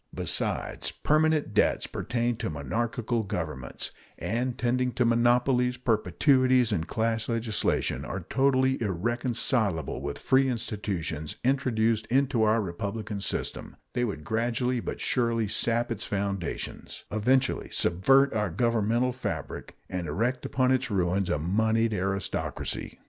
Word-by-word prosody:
Besides, - - -2
permanent 155 -5 +1
debts 105 - +2
pertain 120 0 -1
to - - -3
monarchical 115 - -1
governments, 80 -10 -5 0.3
and, 120 +3 -2
tending 125 +1 0
to 125 - +2
monopolies, 125 +2 +3
perpetuities, 125 - +3
and 85 -5 -1
class 115 0 -1
legislation, 115 -2 0
are 95 - -4
totally 130 -1 +2
irreconcilable 110 - 0
with 70 - -4
free 135 0 +3
institutions 100 - -3
introduced 115 -4 +1
into 135 -2 +2
our 110 +1 +4
republican 100 +3 -4
system, - - -3 0.2
they 125 - 0
would 100 -10 -3
gradually 120 - 0
but - - -5
surely 115 -3 +1
sap 115 +3 0
its 115 - -3
foundations, 100 -3 -4
eventually 130 +5 +1
subvert 135 +11 +3
our 105 -2 0
governmental 115 +5 +1
fabric, 125 - -5
and 90 -2 -4
erect 125 +6 -1
upon 130 -1 +2
its 130 -1 +1
ruins 95 -1 +1
a 85 - +1
moneyed 110 +7 +1
aristocracy. 95 0 -3
115 Hz, 120 wpm, -28 LUFS, 100-125 Hz, 0.3 s, our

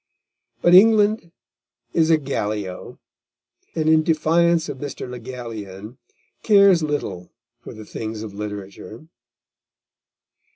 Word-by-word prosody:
But 175 - +4
England 210 -2 +5 0.6
is 160 -1 +2
a 160 - +5
Gallio, 105 -9 -5 0.8
and 155 -2 -1
in 160 0 +5
defiance 165 +1 +2
of 130 - -7
Mr. 140 -2 -6
Le 125 0 -8
Gallienne, 115 -2 -9 0.4
cares 200 -5 +5
little 145 - -4 0.3
for - - -11
the 110 0 -10
things 110 0 -6
of 105 -3 -8
literature. 105 +3 -8
135 Hz, 110 wpm, -21 LUFS, 105-165 Hz, 0.8 s, England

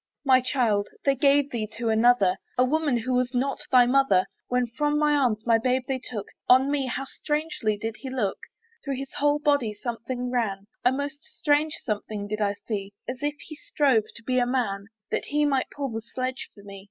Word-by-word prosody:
My 260 -1 +6
child! 230 -6 +1 0.2
they 275 - +5
gave 280 +1 +3
thee 220 -3 -2
to 230 -1 -1
another, 220 -4 +4 0.2
A 250 - +5
woman 295 -1 +1
who 250 +2 -2
was 250 0 0
not 270 +2 0
thy 250 -2 +7
mother. 250 -7 +4 0.2
When 250 0 +1
from 295 +5 0
my 300 0 +3
arms 240 -7 +1
my 230 -1 +4
babe 255 +2 +1
they 265 -2 -1
took, 220 -5 -6 0.2
On 260 +2 +6
me 280 -2 0
how 270 +2 -3
strangely 295 -8 -2
did 220 +1 -4
he 265 - -7
look! 240 -7 -1 0.4
Through 275 -1 -2
his 270 +1 -7
whole 290 0 +3
body 285 -8 +1
something 245 +2 -4
ran, 205 -6 -1 0.2
A 250 - +5
most 285 +2 -4
strange 300 +1 0
something 210 -2 -3
did 215 +1 -3
I 200 -1 +2
see; 200 -3 -4
As 250 +1 -5
if 295 0 -1
he 310 - -10
strove 275 -7 +2
to 230 - -10
be 255 +2 +1
a 245 - +2
man, 200 -6 -1 0.2
That - - -1
he 295 +1 +1
might 275 -3 +1
pull 280 -1 -4
the 225 0 -4
sledge 255 +3 -4
for 200 - -15
me. 200 -1 -10
250 Hz, 205 wpm, -26 LUFS, 220-280 Hz, 0.4 s, thy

